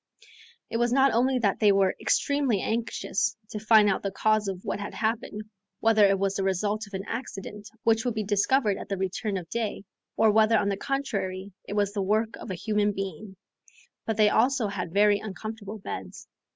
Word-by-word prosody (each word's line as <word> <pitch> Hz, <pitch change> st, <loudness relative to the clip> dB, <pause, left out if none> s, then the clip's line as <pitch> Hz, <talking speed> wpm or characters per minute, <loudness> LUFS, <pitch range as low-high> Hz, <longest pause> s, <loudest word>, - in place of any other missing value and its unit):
It 230 Hz, -, 0 dB
was 240 Hz, 0 st, +1 dB
not 270 Hz, +1 st, +4 dB
only 255 Hz, +3 st, +2 dB
that 205 Hz, -5 st, +1 dB
they 210 Hz, -2 st, +5 dB
were 195 Hz, -1 st, +2 dB
extremely 280 Hz, -7 st, +1 dB
anxious 220 Hz, -1 st, -1 dB
to 210 Hz, -, -4 dB
find 215 Hz, 0 st, +5 dB
out 195 Hz, -, +1 dB
the 200 Hz, -, -2 dB
cause 215 Hz, +2 st, +1 dB
of 190 Hz, -1 st, -5 dB
what -, -, -2 dB
had 205 Hz, -, -6 dB
happened, 220 Hz, -1 st, -2 dB, 0.4 s
whether 225 Hz, -1 st, +4 dB
it 195 Hz, 0 st, +2 dB
was 195 Hz, 0 st, 0 dB
the 195 Hz, -, -2 dB
result 205 Hz, +3 st, -1 dB
of 200 Hz, -, -8 dB
an 190 Hz, +1 st, -5 dB
accident 210 Hz, -3 st, -6 dB
which 225 Hz, 0 st, +3 dB
would 245 Hz, -3 st, -2 dB
be 215 Hz, -, -1 dB
discovered 205 Hz, +2 st, +2 dB
at -, -, -9 dB
the 195 Hz, -, -2 dB
return 195 Hz, +2 st, -2 dB
of 175 Hz, -3 st, -7 dB
day, 225 Hz, -4 st, -3 dB, 0.3 s
or 220 Hz, -1 st, +5 dB
whether 220 Hz, +1 st, +4 dB
on 200 Hz, -, +1 dB
the 200 Hz, -, 0 dB
contrary 200 Hz, -7 st, -3 dB, 0.2 s
it -, -, -5 dB
was 205 Hz, -1 st, 0 dB
the 205 Hz, -, -1 dB
work 215 Hz, +3 st, 0 dB
of -, -, -9 dB
a 185 Hz, -, -3 dB
human 210 Hz, +2 st, 0 dB
being; 195 Hz, 0 st, -6 dB, 0.7 s
but 225 Hz, -2 st, -1 dB
they 210 Hz, -1 st, +5 dB
also 240 Hz, 0 st, +2 dB
had 180 Hz, -4 st, -4 dB
very 205 Hz, +2 st, +4 dB
uncomfortable 215 Hz, 0 st, -7 dB
beds. 200 Hz, -, -8 dB
210 Hz, 200 wpm, -27 LUFS, 195-225 Hz, 0.7 s, they